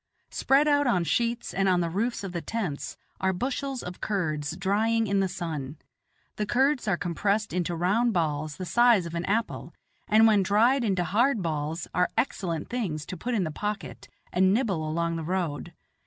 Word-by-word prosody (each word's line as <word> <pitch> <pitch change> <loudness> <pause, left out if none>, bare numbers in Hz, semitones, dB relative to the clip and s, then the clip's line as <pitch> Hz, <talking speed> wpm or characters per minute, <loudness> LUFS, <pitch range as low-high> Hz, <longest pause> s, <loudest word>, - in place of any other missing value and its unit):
Spread 275 +3 +3
out 290 -1 +3
on 180 -8 +2
sheets 235 +6 -1
and 195 0 +2
on 180 -1 +3
the 170 -1 0
roofs 225 +5 -1
of 195 - -4
the 175 -1 -3
tents 190 -11 -4 0.2
are 190 - +2
bushels 260 +6 -3
of 180 0 -8
curds 160 -6 -2
drying 220 +4 +1
in 200 -1 +1
the 195 - +2
sun; 155 -5 -5 0.6
the 210 - 0
curds 265 +1 +2
are 195 -4 +2
compressed 200 +6 -1
into 175 -1 -1
round 205 +8 +2
balls 155 -5 -1
the 185 - -5
size 235 0 +4
of 170 - -7
an 170 +1 -2
apple, 225 +3 -2 0.3
and 220 +1 +6
when 215 -3 +5
dried 230 +7 +3
into 190 -5 +1
hard 220 - +2
balls 155 +1 -3
are 180 +1 +2
excellent 180 - -1
things 180 -12 -3
to - - -6
put 240 +8 -3
in 200 - +1
the 160 - -3
pocket 210 +6 -5 0.2
and 190 +1 +4
nibble 190 -11 0
along 170 +1 -1
the 165 - -4
road. 170 -3 -2
190 Hz, 185 wpm, -27 LUFS, 170-230 Hz, 0.6 s, and